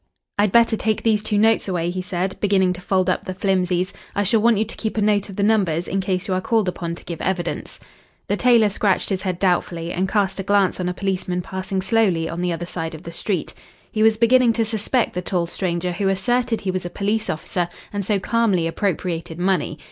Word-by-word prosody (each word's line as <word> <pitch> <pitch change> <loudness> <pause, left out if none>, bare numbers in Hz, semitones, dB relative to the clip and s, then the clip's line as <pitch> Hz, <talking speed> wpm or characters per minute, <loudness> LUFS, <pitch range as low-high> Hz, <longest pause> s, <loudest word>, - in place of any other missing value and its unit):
"I'd 205 -1 +3
better 235 0 +5
take 220 0 -1
these 220 -2 +3
two 210 -1 -1
notes 220 +1 +3
away," 175 -2 -1
he 185 +1 -3
said, 185 +1 -2
beginning 190 -3 +2
to 180 - -9
fold 185 0 +1
up 185 - 0
the 185 - -5
flimsies. 185 -1 0 0.2
"I 205 - +2
shall 215 +3 +3
want 230 -1 +4
you 215 - +1
to 220 - -6
keep 220 -1 -4
a - - +3
note 205 -1 +2
of 195 - -8
the 200 - 0
numbers, 190 -6 +2
in 195 - -1
case 185 -1 -2
you 190 - 0
are 185 - 0
called 220 -1 +1
upon 170 -2 -3
to - - -12
give 170 -2 -6
evidence." 180 -2 -3 0.5
The 205 - +1
tailor 235 -2 +4
scratched 200 -1 +1
his 190 -2 -1
head 185 -2 -2
doubtfully, 175 -2 0
and 185 +1 -1
cast 195 -2 0
a - - -2
glance 200 -1 +2
on 180 -1 -1
a - - -2
policeman 185 -2 -2
passing 190 +1 -3
slowly 195 -7 +2
on 170 +2 -4
the 180 0 0
other 170 +1 -3
side 165 -2 -4
of 160 - -11
the 170 - -7
street. 180 0 -2 0.4
He 215 - -1
was 220 0 +5
beginning 240 +1 +4
to 225 0 +1
suspect 220 +3 0
the 180 - -2
tall 175 -1 -1
stranger 175 0 -2
who 195 +3 -1
asserted 235 +5 0
he 190 - -1
was 185 0 -3
a 175 - -4
police 210 +4 -1
officer, 175 +2 -2 0.2
and 205 0 -2
so 205 +1 +1
calmly 205 -5 +1
appropriated 165 -2 -2
money. 180 -3 0
190 Hz, 230 wpm, -21 LUFS, 180-210 Hz, 0.5 s, better